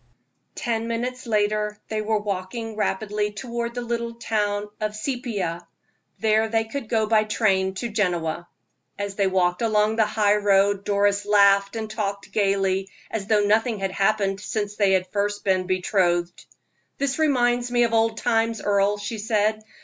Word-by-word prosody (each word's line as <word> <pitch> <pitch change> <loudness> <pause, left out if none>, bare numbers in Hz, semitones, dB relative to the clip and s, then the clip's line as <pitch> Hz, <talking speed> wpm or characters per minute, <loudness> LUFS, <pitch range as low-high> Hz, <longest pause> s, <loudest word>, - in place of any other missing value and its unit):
Ten 230 -2 -2
minutes 245 +2 -3
later 210 -1 0
they 215 -1 -1
were 215 0 0
walking 210 +3 -4
rapidly 210 0 -1
toward 235 +1 -4
the 245 - -3
little 235 0 -3
town 210 -3 -1
of 215 0 -2
Seipia: 215 -8 -3 0.5
there 220 0 +2
they 225 0 +1
could 225 +1 -6
go 220 -2 +2
by 215 0 +3
train 195 -3 +1
to 235 - -3
Genoa. 175 -6 -1 0.5
As 200 0 -3
they 195 -1 +1
walked 180 0 +1
along 215 -1 +2
the 220 - +4
high 210 -1 +2
road 200 -1 +2
Doris 205 0 +2
laughed 200 0 +4
and 220 -1 -3
talked 200 -2 -4
gayly, 195 -1 +1 0.2
as 205 -3 -3
though 210 -1 +3
nothing 220 +2 +2
had 195 -1 -2
happened 195 0 +1
since 205 0 -3
they 195 -2 +4
were 185 - -4
first 205 0 -1
betrothed. 185 -2 0 0.5
"This 280 +1 -1
reminds 245 -5 +2
me 240 0 +3
of 230 -1 0
old 225 0 +2
times, 225 -1 +1
Earle," 200 0 +2
she 215 +2 -5
said. 215 0 +1
210 Hz, 155 wpm, -24 LUFS, 200-225 Hz, 0.5 s, the